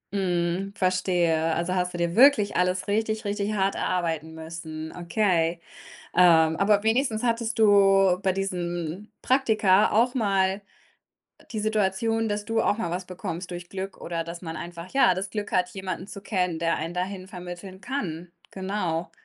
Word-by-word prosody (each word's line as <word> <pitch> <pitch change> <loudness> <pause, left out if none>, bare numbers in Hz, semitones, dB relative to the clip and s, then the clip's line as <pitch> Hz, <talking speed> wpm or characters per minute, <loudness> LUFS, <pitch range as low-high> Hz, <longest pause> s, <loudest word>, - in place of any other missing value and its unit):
Mhm, 180 0 -1
verstehe. 175 -3 +1
Also, 170 +2 -1
hast 180 -1 -1
du - - -3
dir 170 0 -1
wirklich 240 -5 +5
alles 180 0 +1
richtig, 220 +1 -1
richtig 205 +1 -1
hart 195 -1 +1
erarbeiten 160 -3 -2
müssen, 160 -1 -7
okay. 175 -2 +1 0.6
Ähm, 160 -3 +6
aber 205 +1 +3
wenigstens 225 0 +1
hattest 230 -1 -1
du 195 -3 +5
bei 190 - +3
diesen 180 0 -4
Praktika 220 -7 +3
auch 240 +4 +2
mal, 195 -3 +1 0.8
äh, - - -21
die 215 - -2
Situation, 215 +1 0
dass 205 0 -2
du 225 +1 0
auch 205 - +2
mal 200 -7 -3
was 180 +1 -4
bekommst 180 -1 -6
durch 175 0 -7
Glück 195 0 -5
oder 165 -1 -4
dass 170 +2 -8
man 160 -1 -5
einfach, 170 +1 -8
ja, 270 -8 +4
das 190 +1 -4
Glück 210 -1 -4
hat, 185 +6 +1
jemanden 190 -2 -5
zu 200 - -9
kennen, 180 -4 -1
der 165 0 +1
einen 160 +2 -4
dahin 185 +1 -4
vermitteln 180 +1 -9
kann. 175 - -4 0.2
Genau. 185 -4 -3
185 Hz, 160 wpm, -26 LUFS, 175-205 Hz, 0.8 s, Ähm